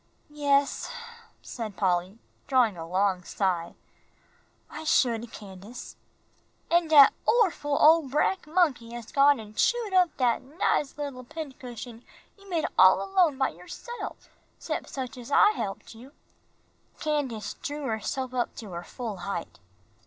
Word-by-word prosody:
"Yes," 285 Hz, -1 st, +1 dB, 0.5 s
said 220 Hz, -5 st, -6 dB
Polly, 185 Hz, +1 st, 0 dB, 0.3 s
drawing 250 Hz, -7 st, +3 dB
a 165 Hz, -1 st, -7 dB
long 185 Hz, +1 st, +1 dB
sigh, 175 Hz, -3 st, -2 dB, 0.9 s
"I 310 Hz, -, -8 dB
should, 235 Hz, -6 st, +1 dB
Candace." 200 Hz, +3 st, -10 dB, 0.8 s
"An' 340 Hz, -1 st, +4 dB
dat 295 Hz, -3 st, +8 dB
orful 335 Hz, -11 st, +2 dB
ole 315 Hz, -2 st, +6 dB
brack 300 Hz, +6 st, 0 dB
monkey 300 Hz, -9 st, +1 dB
has 240 Hz, -1 st, -7 dB
done 280 Hz, 0 st, +5 dB
gone -, -, -9 dB
an' 215 Hz, -1 st, -10 dB
chewed 460 Hz, -, +1 dB
up 365 Hz, -2 st, +3 dB
dat 245 Hz, -3 st, +2 dB
nice 285 Hz, 0 st, -1 dB
little 280 Hz, -4 st, -5 dB
pincushion 250 Hz, -5 st, -8 dB, 0.3 s
you 395 Hz, -1 st, -18 dB
made 335 Hz, -4 st, 0 dB
all -, -, +7 dB
alone 365 Hz, -7 st, +2 dB
by 265 Hz, -, +2 dB
yourself, 180 Hz, -, -9 dB, 0.3 s
'xcept -, -, -4 dB
such 255 Hz, -3 st, -6 dB
as 240 Hz, -, -10 dB
I 415 Hz, +9 st, +6 dB
helped 200 Hz, -, -5 dB
you." 250 Hz, +5 st, -14 dB, 0.9 s
Candace 270 Hz, -, -2 dB
drew 295 Hz, +1 st, -4 dB
herself 250 Hz, +3 st, -3 dB
up 245 Hz, -1 st, -2 dB
to 215 Hz, -4 st, -9 dB
her 170 Hz, 0 st, -6 dB
full 220 Hz, +2 st, -6 dB
height. 175 Hz, -1 st, -5 dB
255 Hz, 140 wpm, -27 LUFS, 215-300 Hz, 0.9 s, dat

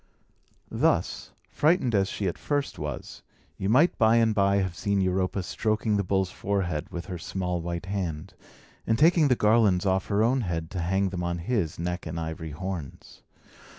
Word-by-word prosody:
Thus, -, -, 0 dB, 0.2 s
frightened 150 Hz, -6 st, +2 dB
as 100 Hz, -2 st, +2 dB
she 100 Hz, -, -2 dB
at 90 Hz, -, -3 dB
first 145 Hz, -1 st, -2 dB
was, -, -, -6 dB, 0.4 s
you 95 Hz, -, -2 dB
might 145 Hz, +10 st, +4 dB
by 110 Hz, 0 st, +5 dB
and 115 Hz, -1 st, +3 dB
by 100 Hz, -1 st, +3 dB
have 95 Hz, -3 st, 0 dB
seen 100 Hz, +2 st, 0 dB
Europa 95 Hz, 0 st, 0 dB
stroking 110 Hz, +3 st, 0 dB
the 100 Hz, -, +1 dB
bull's 95 Hz, 0 st, 0 dB
forehead 95 Hz, -6 st, -2 dB
with 85 Hz, -1 st, -6 dB
her 90 Hz, -3 st, -6 dB
small 90 Hz, 0 st, -3 dB
white 85 Hz, +1 st, -4 dB
hand, 95 Hz, -3 st, -4 dB, 0.5 s
and 110 Hz, -, +2 dB
taking 160 Hz, +2 st, +5 dB
the 125 Hz, -, +3 dB
garlands 105 Hz, -4 st, +3 dB
off 95 Hz, 0 st, +1 dB
her 105 Hz, +1 st, +2 dB
own 125 Hz, +3 st, +2 dB
head 85 Hz, -5 st, -3 dB
to 95 Hz, -, -4 dB
hang 95 Hz, +3 st, +1 dB
them 90 Hz, -1 st, -4 dB
on 85 Hz, 0 st, -1 dB
his 85 Hz, -3 st, -1 dB
neck 90 Hz, +1 st, -3 dB
and 80 Hz, +1 st, -4 dB
ivory 80 Hz, 0 st, -5 dB
horns. 85 Hz, -1 st, -7 dB
95 Hz, 180 wpm, -27 LUFS, 85-110 Hz, 0.5 s, by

